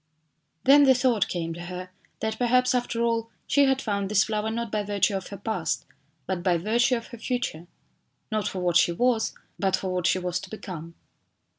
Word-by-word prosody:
Then 285 +2 +7
the 265 -1 +6
thought 245 -5 +2
came 165 -2 -3
to 175 +1 -8
her 180 0 -7 0.3
that 220 0 -2
perhaps 250 +1 +3
after 240 -2 0
all 230 -1 0 0.2
she 285 -1 +4
had 265 -1 +2
found 200 -3 -1
this 210 -1 +4
flower 215 0 -1
not 230 -1 -3
by 215 - 0
virtue 200 -1 +1
of 190 -1 -4
her 200 - -7
past 185 -6 -2 0.4
but 185 -1 -2
by 180 -1 +2
virtue 235 +8 +2
of 230 - -5
her 235 - -10
future; 225 -9 -3 0.6
not 215 -1 0
for 185 - -3
what 175 -1 +3
she 175 - +4
was, 240 +3 +1 0.2
but 190 -1 +2
for 185 -1 -3
what 180 -1 +1
she - - +3
was 180 -1 -2
to - - -10
become. 170 -6 -8
210 Hz, 200 wpm, -26 LUFS, 180-235 Hz, 0.6 s, Then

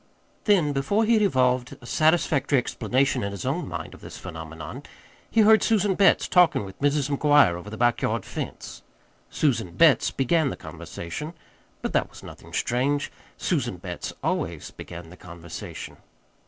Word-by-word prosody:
Then, 175 -9 +3
before 200 +11 +1
he 230 - +3
had 220 - +4
evolved 125 -8 +1
a - - -14
satisfactory 155 -1 +2
explanation 130 +2 0
in 100 - -2
his 100 +1 -6
own 150 +7 -1
mind 85 -2 -6
of - - -14
this - - -9
phenomenon, 80 -3 -8 0.5
he 225 - +3
heard 220 +1 +6
Susan 210 -3 +2
Betts 195 +1 +4
talking 180 - +4
with 95 +4 -12
Mrs. 145 -1 +2
McGuire 145 - +5
over 90 +4 -7
the 110 - -7
back 120 -1 +2
yard - - -1
fence. - - -6 0.5
Susan 115 - 0
Betts 140 - +5
began 145 +3 +1
the - - -5
conversation. 150 - -7 0.5
But - - -2
that - - +1
was - - -14
nothing - - -12
strange: 140 +4 0 0.3
Susan 125 - -1
Betts 90 -1 -6
always - - -2
began 85 -1 -10
the 90 - -13
conversation. 85 -1 -9
135 Hz, 160 wpm, -25 LUFS, -, 0.5 s, heard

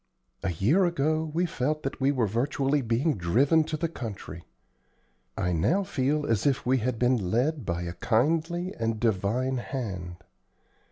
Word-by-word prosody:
A 95 - -1
year 130 - +3
ago 155 -1 0
we 170 +4 +1
felt 155 -1 -2
that 135 - -4
we 135 +1 +4
were 125 -5 +1
virtually 135 +6 0
being 120 - 0
driven 135 - +3
to 160 0 -3
the 165 - 0
country. 100 - -7 0.9
I 90 - 0
now 165 - +2
feel 145 -2 0
as 115 -1 +1
if 135 -3 +1
we 130 +1 +3
had 120 +1 -1
been 120 -6 +1
led 130 - 0
by 85 0 -1
a 85 0 -4
kindly 165 - 0
and 115 -1 -1
divine 115 +4 0
hand." 95 -9 -5
130 Hz, 160 wpm, -27 LUFS, 110-155 Hz, 0.9 s, we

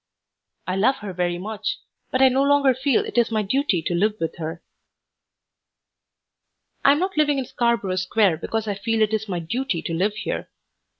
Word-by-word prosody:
I 185 +1 -2
love 245 +7 +3
her 195 - -5
very 175 0 -1
much, 210 +3 -4 0.3
but 260 +1 +2
I 265 - +7
no 260 +2 +1
longer 280 -1 +4
feel 260 0 +1
it - - 0
is 235 - +2
my 215 -2 0
duty 210 - 0
to 175 - -1
live 210 +5 +1
with 165 - -3
her. 165 +1 -6 2.2
I 275 - +7
am - - 0
not 375 +1 -2
living 295 -2 +3
in 265 - -2
Scarborough 230 -7 0
Square 185 -1 +2
because 220 +6 -3
I 205 - 0
feel 220 +3 0
it 215 0 0
is 220 -1 -2
my 180 - -1
duty 175 +2 -2
to 165 - -3
live 200 +5 0
here. 220 - -4
220 Hz, 190 wpm, -23 LUFS, 185-260 Hz, 2.2 s, I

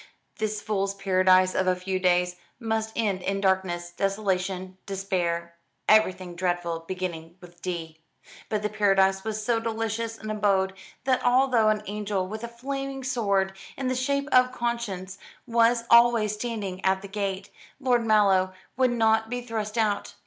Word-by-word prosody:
This 215 -1 -2
fool's 195 -2 -1
paradise 185 -1 +4
of 185 - 0
a 185 - +3
few 185 +1 -3
days 180 -1 +2 0.2
must 220 -2 -1
end 205 -5 0
in 195 +2 -1
darkness, 185 -3 0
desolation, 190 -1 -2
despair 175 -3 -2 0.3
everything 185 -4 +3
dreadful 175 -2 -1
beginning 170 -3 -5
with 175 -1 -16
d; 165 -3 -5 0.5
but 210 -1 -1
the 210 - 0
paradise 195 -2 +3
was 215 -1 -3
so 235 -1 +2
delicious 225 0 -3
an 215 0 -6
abode 195 -2 +1 0.3
that 255 0 +1
although 245 -3 +4
an 215 0 0
angel 205 -2 -2
with 215 +3 -6
a - - -3
flaming 270 +3 -5
sword, 200 -7 0 0.2
in 265 -1 -1
the 255 - 0
shape 280 +2 0
of 255 0 +5
conscience, 215 -6 -3 0.3
was 235 0 +3
always 235 -3 +6
standing 210 -4 -4
at 190 0 +1
the - - -6
gate, 195 -1 -4 0.3
Lord 250 -3 +2
Mallow 195 -4 +3 0.2
would 255 0 +3
not 220 -2 +2
be 245 +1 -2
thrust 220 -2 -4
out. 210 -3 0
205 Hz, 155 wpm, -26 LUFS, 185-230 Hz, 0.5 s, always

